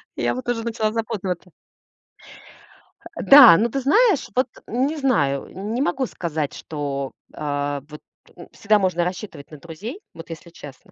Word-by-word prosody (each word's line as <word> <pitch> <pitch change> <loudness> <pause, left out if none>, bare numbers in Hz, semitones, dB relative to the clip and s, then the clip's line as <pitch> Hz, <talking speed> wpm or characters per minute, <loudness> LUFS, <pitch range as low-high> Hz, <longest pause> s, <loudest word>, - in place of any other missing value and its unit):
Я - - -1
вот 255 -1 -7
уже 230 -2 -1
начала 225 -2 -1
запутываться. 195 -6 -4 1.6
Э, - - -5
да, 270 -11 +10
ну 230 +5 +1
ты 275 - -2
знаешь, 395 - +3
вот 255 +1 +2 0.2
не 265 +7 -1
знаю. 145 - +1 0.3
Не 245 - -1
могу 270 -1 0
сказать, 160 - -4
что, 140 -3 -5 0.2
э, 145 -1 -3
вот, 150 0 -11 0.3
ну, - - -13
всегда 210 0 +2
можно 185 -3 +1
рассчитывать 180 -5 -6
на 155 - -10
друзей. 195 - -8
Вот 165 +1 -11
если 165 +1 -9
честно. 145 -5 -13
190 Hz, 155 wpm, -22 LUFS, 150-245 Hz, 1.6 s, да